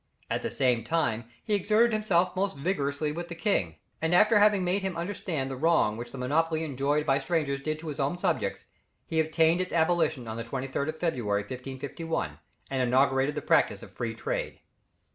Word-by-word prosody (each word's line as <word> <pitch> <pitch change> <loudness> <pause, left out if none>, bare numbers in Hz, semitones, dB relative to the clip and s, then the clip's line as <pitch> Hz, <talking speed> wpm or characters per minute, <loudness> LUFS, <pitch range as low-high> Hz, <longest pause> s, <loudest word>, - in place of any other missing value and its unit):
At - - 0
the - - -2
same 125 -4 +1
time 120 -9 0 0.2
he 215 - -2
exerted 215 +4 +3
himself 185 -4 +2
most 190 -4 -1
vigorously 145 -2 -1
with 170 +3 -5
the 170 - -7
king, 130 - 0 0.3
and 160 +2 +2
having 210 0 +5
made 180 +3 +1
him 190 -3 -3
understand 170 -6 -3
the - - -3
wrong 155 -7 +3
which 120 +1 -7
the 135 - -8
monopoly 160 +5 +1
enjoyed 145 +1 0
by 135 -2 +3
strangers 150 -5 -1
did 155 +2 -2
to 160 +1 -9
his 150 -1 -5
own 140 +5 0
subjects, - - -1 0.4
he 160 -1 -1
obtained 160 +2 +3
its 185 - -4
abolition 160 -6 +1
on 110 0 -5
the 115 - -3
23rd 135 +4 -3
of 155 0 -5
February, 115 -12 0
1551, 130 - -5 0.3
and 135 -1 0
inaugurated 135 +3 +2
the - - -3
practice - - +2
of - - -11
free - - -4
trade. - - -3
155 Hz, 185 wpm, -28 LUFS, 135-175 Hz, 0.4 s, having